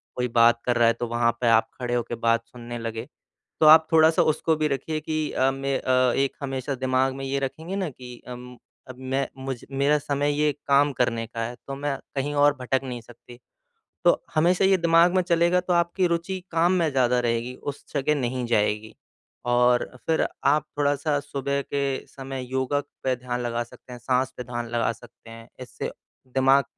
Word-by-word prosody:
कोई 125 0 -1
बात 115 0 +6
कर 120 -1 +1
रहा 120 -1 +5
है 115 - +4
तो 120 +1 -4
वहाँ 120 0 +2
पे 120 - +2
आप 115 0 +4
खड़े 125 -1 -2
होके 120 0 -2
बात 115 0 +1
सुनने 120 0 -8
लगे। 115 0 -5 0.5
तो 155 - +6
आप 160 +1 +8
थोड़ा-सा 160 0 +5
उसको 160 +1 +1
भी 155 0 +1
रखिए 150 +3 -2
कि 155 0 -2
अ, 130 +1 +2
मैं 135 0 -2
अ, 130 -1 +2
एक 135 0 +1
हमेशा 135 0 -3
दिमाग 130 0 0
में 135 0 -6
ये 135 +1 -1
रखेंगे 160 +8 -4
न 190 -5 -2
कि 125 -2 -12
उम, 125 0 -9 0.3
अब 130 - -9
मैं 135 +1 -1
मुझ 135 0 -4
मेरा 140 +2 +2
समय 145 0 -1
ये 150 -1 +3 0.2
काम 140 +1 +4
करने 115 -2 +1
का 115 +1 -7
है 120 +1 -7
तो 135 - -3
मैं 140 0 -2 0.2
कहीं 145 +2 -1
और 145 0 +4
भटक 130 +1 0
नहीं 125 -2 -5
सकती। 120 +1 -15 0.7
तो - - +4
हमेशा 175 +4 +3
ये 190 0 +5
दिमाग 170 +1 +4
में 185 - +4
चलेगा 175 +1 +2
तो 180 0 -2
आपकी 175 +2 +2
रूचि 170 +3 -2
काम 170 +2 +3
में 170 -4 +2
ज़्यादा 125 -2 +2
रहेगी। 120 +1 -1
उस 145 +1 -7
जगह 145 +1 +1
नहीं 125 0 -2
जाएगी 110 -1 0 0.5
और 120 0 +3 0.2
फिर 160 - +2 0.2
आप 145 +2 +3
थोड़ा-सा 145 +1 +1
सुबह 140 0 -2
के 140 -1 -2
समय 135 -1 -7
योगा 130 +2 0 0.2
पे 130 -1 +2
ध्यान 125 0 -4
लगा 120 -1 -2
सकते 120 +1 -15
हैं, 125 - -8
साँस 130 +2 0
पे 125 - -6
ध्यान 120 0 -5
लगा 115 -1 0
सकते 115 -1 -16
हैं। 115 +1 -12
इससे 125 - -6 0.4
दिमाग 135 +2 +3
130 Hz, 195 wpm, -25 LUFS, 120-145 Hz, 0.7 s, आप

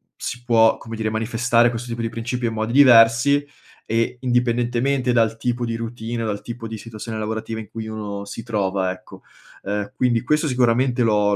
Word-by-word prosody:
si 120 0 -6
può, 115 -2 +4
come 115 0 -8
dire, 110 -1 -2
manifestare 115 +2 +2
questo 120 +1 -5
tipo 115 0 -4
di 115 - -1
principio 120 +2 -3
in 110 - -3
modi 110 +1 -2
diversi 125 +1 +6 0.4
e 115 +2 0
indipendentemente 125 +1 +1
dal 115 -1 +2
tipo 120 +1 -2
di 115 -1 -3
routine 115 0 -4
dal 105 -2 -3
tipo 120 -1 -7
di 110 - -6
situazione 110 0 -7
lavorativa 110 +1 -4
in 110 -3 -9
cui 115 -1 -6
uno 105 -2 -5
si 100 +3 -7
trova, 95 -4 -1
ecco. 95 - -12 0.4
Uhm, 105 +4 -3
quindi 120 -2 +1
questo 150 +4 +1
sicuramente 125 -1 +2
l'ho 105 -2 +2
115 Hz, 180 wpm, -22 LUFS, 110-120 Hz, 0.4 s, diversi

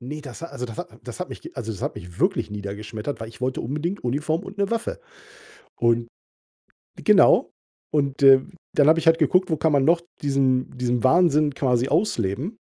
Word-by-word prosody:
Ne, 145 +5 -7
das 140 +2 -10
ha - - -4
also, 125 -6 -6
das 115 -2 -10
hat - - -6
das - - -9
hat - - -4
mi - - -7 0.2
also, 110 - -4
das 100 - -9
hat - - -3
mich 85 0 -10
wirklich - - +1
niedergeschmettert, 105 +5 -6
weil 110 - -6
ich 115 - -15
wollte 130 0 -2
unbedingt 155 - -4
Uniform 155 +8 -1
und 195 +2 -10
'ne 200 +1 0
Waffe. 230 - -3 0.8
Und 115 0 +1 1.0
Genau, - - +5 0.4
und, 140 -2 0
äh, 135 -1 +8 0.3
dann 145 -1 +5
habe 160 - +6
ich - - -5
halt 165 0 +5
geguckt, 185 0 +3
wo 160 - +1
kann 160 - +1
man 135 -1 +3
noch 170 +1 +4 0.2
diesen 135 -2 +1
diesen 125 -1 -1
Wahnsinn 150 -1 +4
quasi 125 -2 +1
ausleben? 160 - -1
140 Hz, 195 wpm, -23 LUFS, 120-160 Hz, 1.0 s, äh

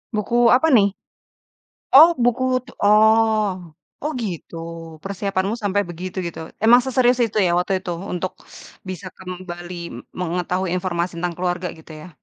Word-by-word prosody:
Buku 215 +3 -2 0.2
apa 290 +6 +3
nih? 200 -3 +5 1.1
Oh 315 +4 +11 0.2
buku 245 +1 +2 0.2
tu - - -12
oh, 220 +1 +5 0.6
oh 300 +2 -2
gitu. 180 -6 -6 0.5
Persiapanmu 195 +1 -2
sampai 205 0 +1
begitu, 175 +2 -7
gitu, 170 - -7 0.3
emang 240 +2 +7
seserius 255 -1 +2
itu 220 -1 -2
ya, - - +1
waktu 180 +3 -1
itu, 180 - -6 0.2
untuk 180 +1 -3 0.6
bisa 185 +1 -6
kembali 180 -1 -8 0.2
m - - -8 0.2
mengetahui 180 +2 -1
informasi 180 -1 -2
tentang 175 0 -3
keluarga, 180 0 -2
gitu 160 0 -13
ya? 180 - -11
190 Hz, 140 wpm, -21 LUFS, 180-220 Hz, 1.1 s, Oh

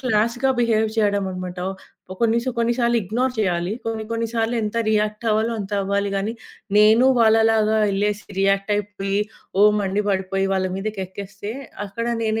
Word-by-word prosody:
క్లాస్‌గా 240 +2 +1
బిహేవ్ 220 -2 +2
చేయడం 205 -2 +2
అనమాట. 185 0 -6 0.5
ఓ - - -4
కొన్ని 230 0 +3
సా 260 - 0
కొన్ని 235 0 +2
సార్లు 235 0 +2
ఇగ్నోర్ 245 +7 -1
చేయాలి. 180 -2 0
కొన్ని 225 -1 -3
కొన్ని 230 0 -1
సార్లు 230 0 0
ఎంత 210 +2 -3
రియాక్టవ్వాలో 215 +1 +1
అంత 200 +1 -7
అవ్వాలి 200 +1 0
గానీ 205 +3 -1 0.4
నేను 215 +4 +6
వాళ్ళలాగా 220 -1 +4
యెళ్ళేసి, 205 +1 -1 0.2
రియాక్టయిపోయి, 195 0 0 0.4
ఓహ్! 210 0 +7
మండి 200 +1 0
పడిపోయి 195 0 0
వాళ్ళ 185 0 0
మీదకెక్కేస్తే, 200 0 -5 0.3
అక్కడ 230 +4 -4 0.2
నేను 220 0 0
210 Hz, 145 wpm, -22 LUFS, 195-225 Hz, 0.5 s, ఓహ్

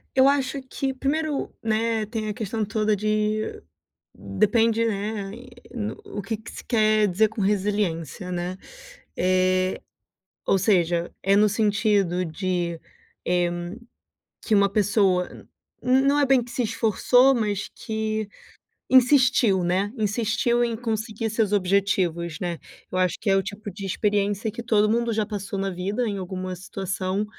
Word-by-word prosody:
Eu 265 0 +6
acho 275 -1 +1
que 265 +1 -3
primeiro, 285 +2 -2
né, 225 0 0
tem 220 -1 -3
a - - -2
questão 220 0 -3
toda 215 0 +1
de, 215 +1 -1 0.5
depende, 220 - +1
né, 205 -2 -3
e 245 +1 -14
no 215 -2 -4
o 205 - -6
que 220 +3 -3
que 220 +2 -11
se - - -9
quer 215 -2 +3
dizer 205 +4 +2
com 220 0 -5
resiliência, 190 -4 -1
né. 180 +1 -3 0.6
Eh, 185 0 +1 0.7
ou 195 - +3
seja, 175 -4 +1
é 195 +1 +3
no 210 +1 +5
sentido 205 -3 +1
de, 175 0 -2 0.5
eh, 175 -1 +2 0.9
que 220 - +2
uma 200 0 +4
pessoa 195 -3 +2
n - - -14 0.6
não 285 +1 +3
é 285 - +4
bem 265 -3 +4
que 245 - -12
se 250 - -1
esforçou, 230 +4 +3
mas 210 -4 -1
que 220 -1 -3 0.6
insistiu, 250 -7 +5
né, 185 +4 +1
insistiu 225 +3 +1
em 230 -1 -2
conseguir 220 -1 -3
seus 215 -2 0
objetivos, 180 -4 +1
né. 175 -2 -3 0.3
Eu 185 - -1
acho 185 -1 +2
que 200 - 0
é 195 - +4
o 195 - +2
tipo 205 +2 -7
de 195 +1 -7
experiência 205 +2 0
que 235 - -6
todo 215 -2 +2
mundo 235 +1 +1
já 215 0 +1
passou 200 -1 -5
na 195 0 -1
vida, 195 +7 -2
em 200 -2 -3
alguma 185 0 -5
situação. 190 +2 -3
210 Hz, 150 wpm, -24 LUFS, 190-225 Hz, 0.9 s, Eu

